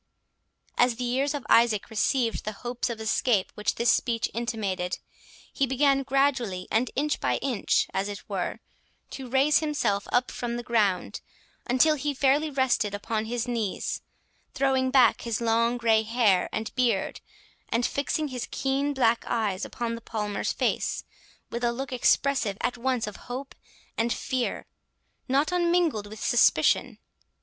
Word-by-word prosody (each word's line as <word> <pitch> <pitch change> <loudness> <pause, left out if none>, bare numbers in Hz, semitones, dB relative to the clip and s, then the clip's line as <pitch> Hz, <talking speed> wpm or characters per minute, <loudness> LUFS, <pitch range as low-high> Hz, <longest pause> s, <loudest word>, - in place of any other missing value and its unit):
As 245 -1 +4
the 250 - -4
ears 270 +4 0
of 285 - -5
Isaac 230 -3 +3
received 230 +1 0
the 215 - -4
hopes 245 +1 -2
of 230 -2 -5
escape 220 -2 +1
which 210 0 -1
this 235 0 +3
speech 230 -2 0
intimated, 205 -6 -2 0.6
he 275 - +1
began 275 +1 +3
gradually, 260 -9 0
and 235 +3 +2
inch 295 +2 0
by - - +1
inch, 255 -7 +1
as 195 +1 -1
it 205 - -8
were, - - -3 0.5
to 265 -2 -7
raise 270 +4 +4
himself 245 -10 -1
up 245 0 +2
from 240 -1 -4
the 240 - -5
ground, 210 -6 0 0.5
until 260 +6 +4
he 290 -1 -2
fairly 280 +4 +2
rested 245 -7 +1
upon 215 +2 -2
his 235 +1 -3
knees, 230 -5 -2 0.5
throwing 265 -1 +2
back 255 -4 +4
his 230 -2 -2
long 230 +1 +2
grey 225 -2 +3
hair 220 -5 +2
and 220 - -4
beard, 235 -6 0 0.5
and 235 +1 +1
fixing 290 +2 -1
his 250 -2 -4
keen 275 +2 -1
black 235 -3 +2
eyes 210 -5 -1
upon 235 -1 -4
the 230 - -6
Palmer's 210 -2 -2
face, - - -1 0.5
with 235 +1 -4
a 240 - +2
look 260 +2 -5
expressive 250 -4 +2
at - - -1
once 250 -1 -1
of 210 -1 -7
hope 265 +3 -5 0.5
and 230 +1 +1
fear, 255 0 -2 0.6
not 280 +5 +2
unmingled 345 -11 +1
with 215 +1 -10
suspicion. 230 +1 +3
240 Hz, 155 wpm, -27 LUFS, 220-265 Hz, 0.6 s, As